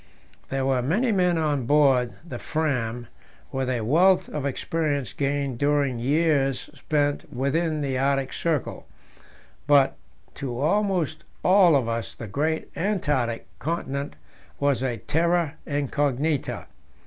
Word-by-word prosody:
There 135 0 -1
were 130 -2 +2
many 200 - +1
men 180 -4 +2
on 145 -6 0
board 135 -4 +4
the - - -6
Fram 125 -7 -1 0.5
with 130 -1 -2
a 125 -3 0
wealth 175 - +4
of 145 -2 -2
experience 145 -2 -2
gained 140 -3 -1
during 145 -4 +1
years 140 0 +1
spent 145 -1 -1
within 150 +4 0
the 135 -2 -1
Arctic 135 0 0
Circle, 160 -5 -2 0.8
but 140 -2 +5 0.4
to 125 -3 -5
almost 180 0 0 0.2
all 185 -4 +6
of 130 -4 +2
us 115 0 -3
the 115 - -7
great 150 +10 -2
Antarctic 145 - -1
continent 140 -3 -3 0.4
was 140 -4 +1
a 125 -3 -1
terra 165 - +1
incognita. 145 0 -1
145 Hz, 125 wpm, -25 LUFS, 130-160 Hz, 0.8 s, all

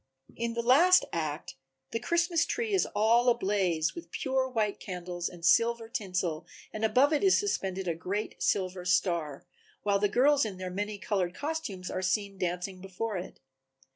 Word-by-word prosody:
In 235 0 -3
the 235 - -1
last 335 +10 +6
act 155 -2 -3 0.4
the 230 - -1
Christmas 340 +6 +1
tree 455 -3 -2
is 385 - +2
all 230 +3 +4
a 240 - +3
blaze 190 -6 0
with 340 - -9
pure 265 -2 -1
white 215 -5 -1
candles 180 -2 -5
and 170 -1 -9
silver 230 +5 +3
tinsel 180 -8 -3 0.3
and 215 - -5
above 255 +7 +4
it 300 - +1
is 385 - +5
suspended 190 - -2
a 170 - +1
great 190 +6 -4
silver 185 -2 0
star, 170 -5 0 0.4
while 200 -1 +2
the 205 0 +2
girls 275 +6 +4
in 205 -4 -4
their 185 -1 -5
many 205 +2 -3
colored 190 -3 -1
costumes 285 -12 -4
are 185 - -2
seen 195 +1 -1
dancing 180 +1 -3
before 195 +3 -4
it. 180 - -8
205 Hz, 170 wpm, -29 LUFS, 180-240 Hz, 0.4 s, last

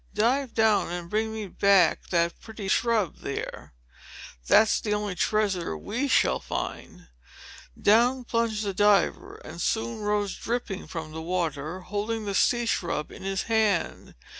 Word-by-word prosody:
"Dive 245 +5 +1
down 220 -5 +3
and 175 -1 -6
bring 220 +1 0
me 220 -1 -5
that 195 -2 +3 0.4
pretty 220 -2 -9
sea - - -3
shrub 220 -6 +1
there. 140 - -6 0.7
That's 220 - +5
the 210 -1 0
only 210 -2 -2
treasure 190 - 0
we 240 - -2
shall - - +3
find!" - - -6 0.7
Down 245 +5 +4
plunged 230 -3 -1
the 200 -2 -2
diver, 205 -1 +2
and 170 - -8
soon 225 0 -1
rose 205 -1 -1
dripping 230 -5 -4
from 160 -2 -6
the 160 +1 -6
water, 165 -1 -3
holding 210 +3 -3
the 200 - -2
sea 240 +4 +2
shrub 170 -8 -2
in - - -11
his 195 0 -2
hand. 220 -5 0
210 Hz, 145 wpm, -26 LUFS, 180-225 Hz, 0.7 s, That's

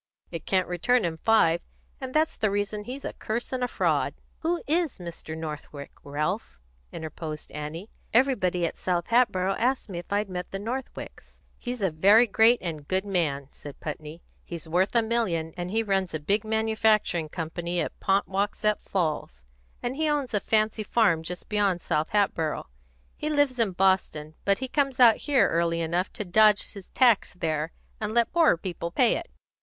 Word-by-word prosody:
It 165 -2 -6
can't 185 -1 +2
return 180 +6 +2
him 160 -1 -3
five; 170 -6 +3 0.4
and 260 -1 -5
that's 310 +3 +1
the 215 - +1
reason 205 +1 -2
he's 260 +3 -7
a - - -4
curse 235 +4 -4
and 255 -1 -1
a - - +1
fraud." - - 0 0.2
"Who 340 +2 -1
is 325 -1 0
Mr. 170 -2 -7
Northwick, 150 -2 -7
Ralph?" 150 - -3 0.3
Annie - - -7
interposed. 155 -1 -6 0.6
"Everybody 200 -9 +2
at - - -4
South 175 -2 -1
Hatboro' 195 -6 +3
asked 255 0 0
me 175 -3 -4
if 175 - -12
I'd 205 +1 +1
met 180 -1 -5
the 195 - -4
Northwicks." 240 +6 -7 0.2
"He's 245 -3 -4
a 190 - +2
very 200 +9 +6
great 225 +2 +5
and 155 -5 -5
good 190 +1 0
man," 155 -8 -1
said 145 -1 -11
Putney. 155 +2 -7 0.2
"He's 170 -2 -7
worth 180 +7 +1
a 230 - +5
million, 185 -9 -1
and 175 0 -4
he 225 +3 +1
runs 195 -5 0
a - - -2
big 200 +8 +1
manufacturing 220 -6 +1
company 170 +1 -3
at - - -3
Ponkwasset 200 +2 +1
Falls, 155 - -2 0.4
and 245 +2 -2
he 310 +1 0
owns 290 -5 -1
a 210 - +3
fancy 215 +1 +1
farm 205 -6 +2
just 180 +2 -7
beyond 205 -4 +1
South 155 -2 -1
Hatboro'. 180 -7 0 0.5
He 305 - -2
lives 290 -4 +2
in 215 -5 +2
Boston, 180 -5 +1
but 200 0 +3
he 260 - -3
comes 275 -1 0
out 235 -3 +7
here 265 -9 +3
early 170 0 +1
enough 170 +3 -1
to 210 - -5
dodge 210 +3 +4
his 200 -3 -10
tax 240 -7 +3
there, 160 -2 -2 0.3
and 215 +1 -3
let 235 -1 +3
poorer 330 - +4
people 170 -1 -4
pay 235 +6 +3
it. 340 - -5
195 Hz, 180 wpm, -26 LUFS, 170-230 Hz, 0.6 s, out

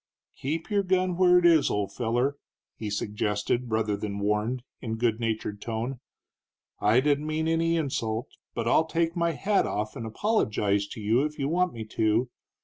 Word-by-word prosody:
"Keep 160 +8 -3
your 205 -1 +3
gun 185 -1 +1
where 180 0 +5
it 180 - +3
is, 165 -4 +5
old 105 -1 -1
feller," 120 +4 0 0.4
he 110 - -5
suggested, 105 +3 -1
rather 110 -2 +1
than 100 -1 -4
warned, 105 +5 0 0.2
in 110 -2 -3
good 115 -1 +1
natured 110 -3 -2
tone. 115 +3 -3 0.8
"I 110 +5 +4
didn't 145 +1 +1
mean 155 +1 -1
any 165 +1 +2
insult, 115 -7 -2 0.3
but 115 -1 -2
I'll 160 +6 +4
take 165 0 0
my 170 -1 +1
hat 200 +7 +1
off 105 +1 -3
and 115 - -5
apologize 105 - +1
to 115 - -8
you 110 +4 +2
if 150 0 -3
you 140 - -1
want 180 +3 +1
me 115 -1 -6
to. 110 +3 +1
120 Hz, 175 wpm, -27 LUFS, 110-165 Hz, 0.8 s, where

